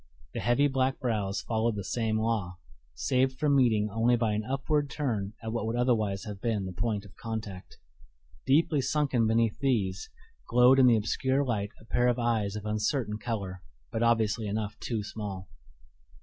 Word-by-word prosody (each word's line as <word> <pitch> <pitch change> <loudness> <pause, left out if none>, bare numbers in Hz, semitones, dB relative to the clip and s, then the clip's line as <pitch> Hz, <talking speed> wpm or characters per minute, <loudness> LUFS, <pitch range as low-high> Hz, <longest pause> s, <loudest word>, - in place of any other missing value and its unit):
The - - -3
heavy 120 +4 +3
black 135 -1 0
brows 105 -5 -1
followed 115 0 0
the 100 - -4
same 110 +2 -1
law, 110 -6 -1 0.4
saved 130 - +1
from 145 0 +2
meeting 110 -6 +3
only 115 +3 +3
by 115 -3 0
an 105 +1 -1
upward 140 +4 0
turn 110 -9 -2
at 110 0 -4
what 115 -2 -2
would 115 - -1
otherwise 110 -6 +1
have 105 -3 -7
been 110 -4 -1
the 95 - -5
point 105 +1 -2
of 100 - -16
contact. 110 -5 -6 0.7
Deeply 150 +1 +3
sunken 135 -4 +1
beneath 115 -1 +1
these, 100 -9 0 0.4
glowed 125 +3 +6
in 130 - +7
the 120 -2 +6
obscure 130 +6 0
light 105 -5 -1
a - - -17
pair 120 +1 +1
of 120 -1 +2
eyes 110 -4 0
of 105 0 -6
uncertain 105 +1 -1
color, 100 -6 -4 0.3
but 115 - -2
obviously 115 -2 +2
enough 105 0 -3
too 110 -4 -3
small. 100 -3 -6
115 Hz, 175 wpm, -29 LUFS, 105-125 Hz, 0.7 s, in